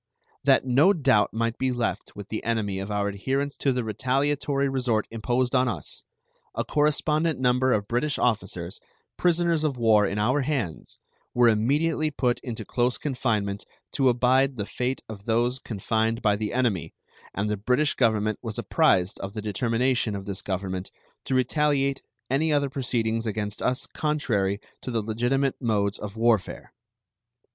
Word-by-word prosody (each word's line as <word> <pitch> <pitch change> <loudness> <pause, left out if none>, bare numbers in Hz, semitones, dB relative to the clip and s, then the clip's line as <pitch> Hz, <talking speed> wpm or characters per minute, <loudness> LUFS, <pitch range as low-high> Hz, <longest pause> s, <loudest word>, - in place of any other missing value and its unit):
That - - +4
no 140 +10 +5
doubt 130 - +3
might 115 +1 -2
be 130 0 +1
left 120 -2 -3
with 105 -1 -9
the 110 - -3
enemy 105 -4 -1
of 100 +2 -5
our 105 -1 0
adherence 135 +8 -2
to 140 - +1
the 125 -1 -1
retaliatory 140 +5 0
resort 125 -5 0
imposed 120 +2 0
on 130 - +3
us, 115 - -4 0.5
a - - -1
correspondent 150 +1 +1
number 125 0 +2
of 100 -3 +1
British 140 +5 0
officers, 95 -7 -1 0.4
prisoners 170 -2 +2
of 145 -4 0
war 110 -3 +4
in 100 - -3
our 125 +7 +2
hands, 125 - -3 0.4
were 120 -1 +5
immediately 150 +8 +1
put 125 -4 0
into 115 -4 -6
close 125 +3 0
confinement 110 -8 -1 0.3
to 135 -3 +3
abide 130 +2 +3
the 105 - -2
fate 125 +4 -2
of 105 -2 -9
those 120 +3 +1
confined 110 +1 -1
by 105 -1 +4
the 105 0 -3
enemy, 120 - -1 0.4
and 100 +2 -1
the 105 - 0
British 125 +9 +1
Government 110 -3 +1
was 110 -3 -5
apprised 90 +1 +2
of 100 0 -6
the 110 - -4
determination 115 +2 0
of 100 -1 -6
this 100 -1 -5
Government 95 -1 -3 0.4
to 130 - -1
retaliate 140 +1 +1 0.3
any 150 +5 +1
other 140 -2 +1
proceedings 115 -4 -1
against 105 -1 -3
us 125 0 0
contrary 105 -10 -1 0.2
to - - -6
the 115 -3 -1
legitimate 120 +6 0
modes 105 -4 0
of 105 +1 -7
warfare. 115 -3 0
120 Hz, 160 wpm, -26 LUFS, 105-135 Hz, 0.5 s, no